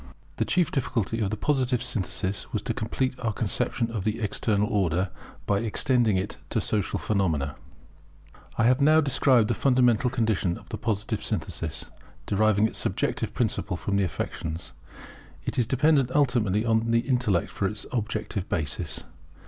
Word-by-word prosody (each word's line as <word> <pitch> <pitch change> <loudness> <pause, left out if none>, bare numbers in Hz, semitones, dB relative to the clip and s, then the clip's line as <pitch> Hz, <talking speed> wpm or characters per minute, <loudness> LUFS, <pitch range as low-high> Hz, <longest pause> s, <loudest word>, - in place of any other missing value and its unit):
[The - - +1
chief 180 -3 +1
difficulty 115 -4 -1
of 105 -3 0
the 110 - -3
Positive 130 -1 +1
Synthesis 100 -4 -2
was - - -2
to - - -1
complete 130 +4 -1
our 115 -3 -1
conception 115 +2 0
of 110 -5 -3
the 110 +2 -1
External 105 -1 +1
Order, 95 -3 0 0.3
by 100 -1 +1
extending 115 -1 +2
it 95 +2 -3
to - - +1
Social 105 -3 0
phenomena] 80 -9 0 1.0
I 115 - +3
have 125 +4 +4
now 155 +2 +6
described 135 -5 +3
the 120 - +1
fundamental 125 -1 +3
condition 110 -8 0
of - - -16
the 110 - -4
Positive 105 -2 -2
Synthesis. - - -3 0.3
Deriving 105 +1 +3
its - - -4
subjective - - -1
principle 90 - -1
from 100 +2 -2
the 100 - +3
affections, 80 -1 -4 0.7
it - - -1
is 120 - +2
dependent 135 +1 +3
ultimately 115 -7 +2
on 115 0 +2
the 115 0 +3
intellect 120 -9 0
for 100 - -1
its 105 +1 -5
objective 110 -4 -3
basis. 75 -3 -2
110 Hz, 155 wpm, -26 LUFS, 100-125 Hz, 1.0 s, now